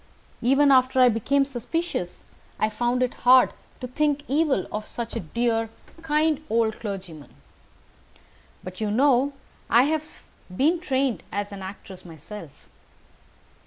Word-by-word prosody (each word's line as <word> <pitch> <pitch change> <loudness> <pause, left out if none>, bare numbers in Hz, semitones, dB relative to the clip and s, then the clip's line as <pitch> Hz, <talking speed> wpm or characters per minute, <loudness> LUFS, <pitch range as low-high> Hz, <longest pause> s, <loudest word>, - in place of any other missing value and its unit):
Even 275 +4 +4
after 260 0 +4
I 250 -1 +7
became 275 +5 +1
suspicious, 270 - -4 0.3
I 215 - 0
found 240 +3 0
it 250 - -1
hard 255 0 +6 0.3
to 250 - -4
think 290 +2 0
evil 285 - +1
of 210 0 -4
such 235 -2 -5
a - - -1
dear, 225 +5 -1 0.3
kind 310 -1 +1
old 225 -1 +1
clergyman. 185 -8 -7 1.3
But, 185 +3 -9
you 215 - 0
know, 270 +4 +3 0.4
I 235 +3 +6
have 310 +2 -3 0.3
been 320 +6 +3
trained 270 -7 -1
as 205 0 -3
an 200 -1 -8
actress 190 -1 -9
myself. 165 0 -11
245 Hz, 130 wpm, -24 LUFS, 210-280 Hz, 1.3 s, I